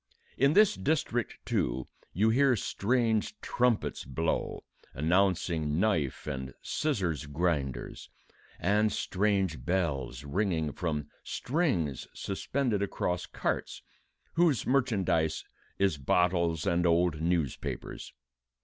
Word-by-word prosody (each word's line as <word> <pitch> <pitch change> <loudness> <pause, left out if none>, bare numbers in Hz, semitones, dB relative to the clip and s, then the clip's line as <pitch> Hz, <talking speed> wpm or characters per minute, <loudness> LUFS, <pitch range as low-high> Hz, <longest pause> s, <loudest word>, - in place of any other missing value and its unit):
In 140 +2 +4
this 210 +1 +6
district, 135 -6 -1
too, - - -1 0.2
you 105 +5 +2
hear 135 +1 +4
strange 115 - 0
trumpets 120 -3 0
blow, 80 +6 -2 0.3
announcing 85 -1 +1
knife 85 -10 0
and 65 -2 -5
scissors 90 - -1
grinders, 75 -3 -2 0.5
and 105 +3 +2
strange 95 - 0
bells 80 -6 -1
ringing 80 0 0
from 75 -2 -2 0.2
strings 120 - -1
suspended 110 +2 -1
across 90 -3 -1
carts, - - -3 0.5
whose 165 -7 +3
merchandise 100 - +1 0.3
is 95 -7 +1
bottles 85 +2 +2
and 85 0 +2
old 85 -2 +2
newspapers. 85 -5 -2
90 Hz, 95 wpm, -30 LUFS, 80-110 Hz, 0.5 s, this